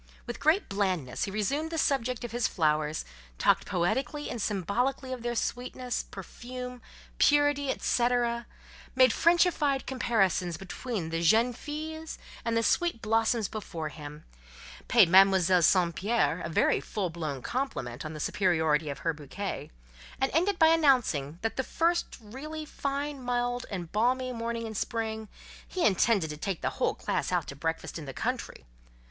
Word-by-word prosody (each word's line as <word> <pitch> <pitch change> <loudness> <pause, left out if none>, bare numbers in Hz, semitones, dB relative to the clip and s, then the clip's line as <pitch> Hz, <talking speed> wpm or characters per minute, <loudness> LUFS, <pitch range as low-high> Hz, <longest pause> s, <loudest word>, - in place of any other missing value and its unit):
With - - -6
great 320 +7 +3
blandness 185 -10 -1
he - - -5
resumed 275 +11 -1
the 325 - -4
subject 250 -6 0
of 240 - -5
his 240 0 +1
flowers; 155 -2 0 0.3
talked - - +3
poetically 265 - -1
and 235 - -4
symbolically 245 +8 -1
of 250 - -6
their 240 0 -2
sweetness, 250 +1 -3
perfume, 250 +6 -8 0.4
purity, 290 -1 +4
etcetera; 240 -2 +1 0.5
made 255 -3 +6
Frenchified 335 -5 +3
comparisons 195 -9 +1
between 195 -1 -5
the 165 0 -1
"jeunes 225 +8 +4
filles" 315 +3 -6 0.3
and 230 -1 0
the 230 - +2
sweet 340 -2 +1
blossoms 225 0 +2
before 170 -7 -5
him; 150 0 -9 0.6
paid - - +6
Mademoiselle 190 0 +6
St. 175 0 +4
Pierre 200 -2 +1
a 170 - -4
very 160 - +3
full 190 -5 -3
blown 155 -6 -4
compliment 135 - -3
on 155 0 -6
the 155 - -7
superiority 160 -4 +1
of 140 - -7
her 165 - +2
bouquet; 155 +7 -5 0.5
and 265 +1 +1
ended 365 +6 +2
by 320 -1 +6
announcing 250 - +3
that 225 - -2
the 265 - +1
first 335 +5 0
really 290 +8 -7
fine, 280 -1 -3
mild, 245 0 -1
and 175 -5 -5
balmy 255 +4 +1
morning 230 0 -3
in 220 - -5
spring, 220 0 -3 0.4
he 365 - -1
intended 195 -4 +3
to 150 - -6
take 185 +2 -3
the - - 0
whole - - +2
class - - -2
out - - +1
to - - -8
breakfast - - -3
in - - -8
the - - -7
country. - - -3
230 Hz, 155 wpm, -29 LUFS, 180-265 Hz, 0.6 s, made